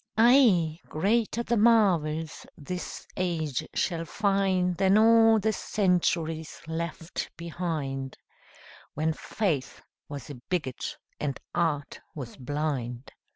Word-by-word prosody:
Ay, 220 - +5
greater 225 +7 +1
the 235 - 0
marvels 175 -9 +2
this 180 +5 -6
age 160 -7 -1
shall 170 -3 0
find 190 0 +1
Than 195 +2 +4
all 225 0 +6
the 220 +1 +1
centuries 170 -6 0
left 165 +1 -4
behind, 155 -6 -4 0.8
When 160 +2 +1
faith 160 -6 -2 0.3
was 145 -1 -7
a 125 -4 -10
bigot 150 -9 -3 0.2
and 140 -3 -2
art 150 -4 -1 0.2
was 130 -6 -7
blind. 135 -3 -3
170 Hz, 105 wpm, -28 LUFS, 150-195 Hz, 0.8 s, all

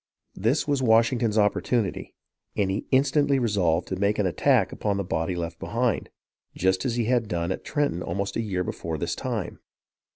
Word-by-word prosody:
This 115 +12 0
was 140 -2 +1
Washington's 115 -1 +3
opportunity, 105 0 0 0.4
and 100 -2 +1
he 100 - -3
instantly 140 +1 +3
resolved 95 -9 +1
to 95 - -1
make 100 +3 +1
an 105 - +1
attack 90 -4 +2
upon 100 -2 -1
the 100 - -1
body 90 0 -2
left 85 -1 -4
behind, 115 -1 -1 0.5
just 95 0 +1
as 120 - 0
he 120 -2 0
had 120 -1 +1
done 85 0 -2
at - - -4
Trenton 145 - -1
almost 100 +4 -3
a - - 0
year 95 -5 -2
before 80 -2 -4
this 85 +2 -2
time. 120 -8 -4
105 Hz, 175 wpm, -26 LUFS, 90-120 Hz, 0.5 s, Washington's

